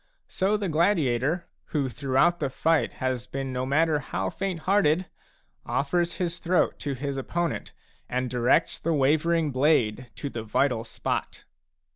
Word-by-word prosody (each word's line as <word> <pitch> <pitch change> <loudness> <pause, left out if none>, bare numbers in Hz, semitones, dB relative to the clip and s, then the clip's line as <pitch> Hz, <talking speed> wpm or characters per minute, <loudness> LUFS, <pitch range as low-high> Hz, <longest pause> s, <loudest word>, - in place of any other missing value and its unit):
So 200 +3 +1
the 205 -2 -2
gladiator, 160 - +1 0.2
who 145 -4 -1
throughout 135 +7 +2
the 140 - -1
fight 160 +4 +1
has 130 -2 -2
been 135 -1 -4
no 125 +1 -2
matter 155 +2 +3
how 95 -8 -3
fainthearted, 185 -2 +1 0.6
offers 175 +5 0
his 175 -2 -2
throat 180 +1 +1
to 140 -2 -3
his 140 +1 -3
opponent 170 +5 -2 0.4
and 125 +1 -1
directs 125 +6 +2
the 165 - 0
wavering 155 +3 +2
blade 130 -4 +2
to 140 +5 -5
the 115 - -4
vital 115 +2 +1
spot. 115 - -4
145 Hz, 140 wpm, -26 LUFS, 130-170 Hz, 0.6 s, matter